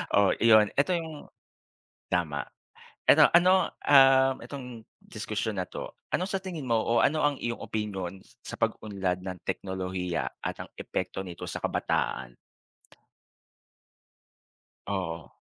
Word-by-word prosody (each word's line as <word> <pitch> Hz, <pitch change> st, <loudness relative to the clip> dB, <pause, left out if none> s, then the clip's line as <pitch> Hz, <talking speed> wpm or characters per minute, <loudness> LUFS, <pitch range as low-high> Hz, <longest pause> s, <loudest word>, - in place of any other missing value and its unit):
O 100 Hz, -1 st, +5 dB
iyon 110 Hz, -2 st, +6 dB
eto 145 Hz, +6 st, +2 dB
yung 160 Hz, -3 st, -6 dB, 0.8 s
tama. 80 Hz, -5 st, 0 dB, 0.6 s
Eto -, -, +7 dB
ano, 185 Hz, +2 st, +5 dB, 0.2 s
ah, 135 Hz, -1 st, +7 dB
itong 125 Hz, -5 st, -8 dB, 0.2 s
diskusyon 110 Hz, -2 st, -3 dB
na 90 Hz, -, -4 dB
'to, -, -, -7 dB, 0.2 s
ano 180 Hz, -, 0 dB
sa 195 Hz, 0 st, -2 dB
tingin 180 Hz, -6 st, -6 dB
mo 115 Hz, -3 st, +2 dB
o 115 Hz, +1 st, +2 dB
ano 155 Hz, +1 st, +2 dB
ang 145 Hz, -1 st, +2 dB
iyong 120 Hz, -2 st, -4 dB
opinyon 95 Hz, -4 st, -4 dB, 0.2 s
sa -, -, -8 dB
pag-unlad 95 Hz, -4 st, -1 dB
ng 90 Hz, 0 st, -6 dB
teknolohiya 90 Hz, -4 st, -3 dB, 0.2 s
at -, -, -4 dB
ang -, -, -17 dB
epekto -, -, -3 dB
nito 90 Hz, -3 st, -7 dB
sa -, -, -5 dB
kabataan? -, -, -1 dB, 2.6 s
Oo. 90 Hz, -5 st, -3 dB
110 Hz, 125 wpm, -28 LUFS, 95-135 Hz, 2.6 s, Eto